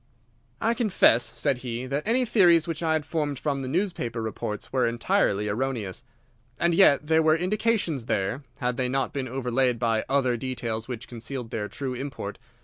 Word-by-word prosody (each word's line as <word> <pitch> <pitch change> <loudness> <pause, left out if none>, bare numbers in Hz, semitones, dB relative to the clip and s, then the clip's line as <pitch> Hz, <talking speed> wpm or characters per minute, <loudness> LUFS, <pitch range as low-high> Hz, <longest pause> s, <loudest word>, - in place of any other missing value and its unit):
"I 230 - +2
confess," 195 - +3
said 140 -4 +1
he, 120 0 -4
"that 140 +7 -3
any 250 +3 +3
theories 175 -8 +5
which 165 -1 -3
I 160 -1 +1
had 155 -2 0
formed 150 -4 -2
from 140 0 -2
the 130 - -4
newspaper 155 - -2
reports 110 -1 -5
were 130 -2 +3
entirely 115 - +1
erroneous. 110 -3 -2 0.6
And 170 0 +3
yet 155 -5 +5
there 160 +1 +3
were 155 0 +4
indications 185 - 0
there, 100 +7 -1 0.2
had 125 -3 -1
they 125 -1 0
not 135 +2 -1
been 135 -3 -3
overlaid 125 0 0
by 115 -1 +1
other 130 -3 +2
details 115 -2 -4
which 125 -1 -6
concealed 120 0 -6
their 105 -2 -2
true 130 +3 -4
import. 125 -6 -6
130 Hz, 175 wpm, -26 LUFS, 120-160 Hz, 0.6 s, theories